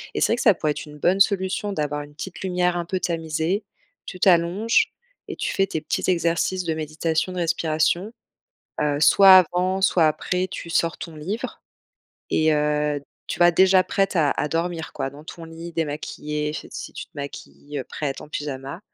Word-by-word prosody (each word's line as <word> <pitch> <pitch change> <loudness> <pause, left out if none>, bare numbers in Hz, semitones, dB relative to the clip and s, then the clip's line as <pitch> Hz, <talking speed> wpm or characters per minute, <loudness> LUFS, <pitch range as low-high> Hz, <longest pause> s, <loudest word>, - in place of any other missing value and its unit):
et - - 0
c'est - - +5
vrai - - +4
que - - -2
ça 210 - +6
pourrait 155 - 0
être - - -5
une 150 - -11
bonne 180 +6 +2
solution 195 0 +1
d'avoir 150 -3 -2
une 145 0 -14
petite 185 +4 -7
lumière 180 -1 0
un 175 - -2
peu 185 +2 -2
tamisée, 165 +3 -1 0.4
tu 185 - -7
t'allonges, 185 +5 +3 0.3
et - - -5
tu - - -2
fais 195 0 +2
tes 160 - -3
petits 155 - -2
exercices 175 +1 +1
de 165 -2 -1
méditation, 160 +3 -1
de 180 - -6
respiration. 170 +4 0 0.7
Heu, 145 -1 +1
soit 190 +5 +8
avant, 185 +3 -1
soit 180 -4 +4
après, 180 +4 -1
tu 180 -3 -7
sors 165 0 +1
ton 165 -1 -7
livre 190 +10 -5 0.7
et 160 0 +3
heu, 150 -1 +1 0.3
tu - - -4
vois? 175 0 +6
Déjà 185 +2 +5
prête 195 +1 0
à 155 -4 +3
à - - -1
dormir 165 +1 -2
quoi, 135 - -3
dans 145 +1 -13
ton 165 +1 -10
lit, 165 +1 -9
démaquillée 150 -1 -3
fait - - -7
si - - -7
tu - - -7
te - - -42
maquilles, 145 0 -8
heu, - - -4
prête 140 +1 -4
en - - -10
pyjama. 140 0 -5
165 Hz, 195 wpm, -23 LUFS, 150-185 Hz, 0.7 s, soit